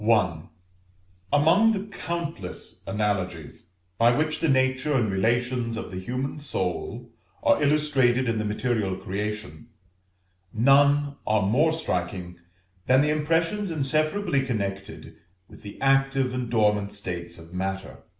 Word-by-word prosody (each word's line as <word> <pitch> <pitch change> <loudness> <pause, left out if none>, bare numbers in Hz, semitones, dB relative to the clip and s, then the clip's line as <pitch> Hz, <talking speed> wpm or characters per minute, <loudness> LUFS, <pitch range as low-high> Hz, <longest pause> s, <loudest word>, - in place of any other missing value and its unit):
Among 165 +10 +5
the 200 0 -4
countless 170 - -5
analogies 95 -6 -3 0.3
by 115 +1 +6
which 155 +4 0
the 165 - +1
nature 130 +2 +2
and 120 -6 +1
relations 120 +3 0
of 115 - -6
the 95 - -5
human 130 +8 -4
soul 95 -11 -4 0.3
are - - +4
illustrated 140 -4 +2
in 115 -1 0
the - - -1
material 105 -2 -1
creation, 100 -4 -5 0.8
none 140 +4 +4
are 110 -1 +2
more 135 +11 +3
striking 90 - -3 0.5
than 130 +1 +5
the 150 +1 +2
impressions 165 +6 0
inseparably 155 +2 +1
connected 100 -6 -4 0.3
with - - -15
the 100 -1 -10
active 135 -1 +2
and 125 -2 -3
dormant 105 -3 +2
states 85 -4 -6
of 80 +1 -13
matter. 95 +1 -4
120 Hz, 120 wpm, -25 LUFS, 100-145 Hz, 0.8 s, by